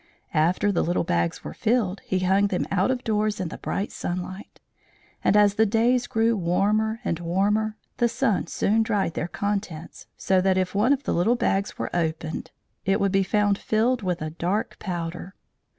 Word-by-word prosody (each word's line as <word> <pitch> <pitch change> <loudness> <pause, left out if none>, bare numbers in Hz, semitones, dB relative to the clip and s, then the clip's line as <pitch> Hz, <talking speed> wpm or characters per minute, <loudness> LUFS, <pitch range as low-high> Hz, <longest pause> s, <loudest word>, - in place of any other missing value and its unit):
After 175 +6 +2
the 185 - +1
little 175 +2 0
bags 85 - -1
were 75 - -6
filled, 215 - 0
he 185 -1 -2
hung 195 +2 +3
them 185 -2 -1
out 195 +2 +2
of 255 -1 -1
doors 215 -1 0
in 180 -3 -2
the - - -8
bright 200 - -3
sunlight; 185 +3 -5 0.6
and 210 - +4
as 205 -1 +5
the 220 +2 +3
days 235 +4 +2
grew 225 -1 +2
warmer 210 +5 +1
and 170 - -1
warmer, 205 +5 0 0.2
the 240 - +2
sun 215 -5 0
soon 215 +6 +1
dried 205 -6 0
their 160 - -2
contents, 190 -3 -4
so 190 -1 +2
that 190 0 +2
if 185 -1 0
one 210 +6 +3
of 285 0 +2
the - - -1
little 200 +8 +3
bags 200 -4 0
were - - -4
opened 160 -1 -2 0.3
it 195 +2 +1
would 200 -2 +1
be 195 0 +3
found 205 +1 +1
filled 230 +3 +1
with 180 -4 -2
a 155 - -4
dark 180 +6 -2
powder. 175 0 -5
195 Hz, 185 wpm, -25 LUFS, 175-215 Hz, 0.6 s, as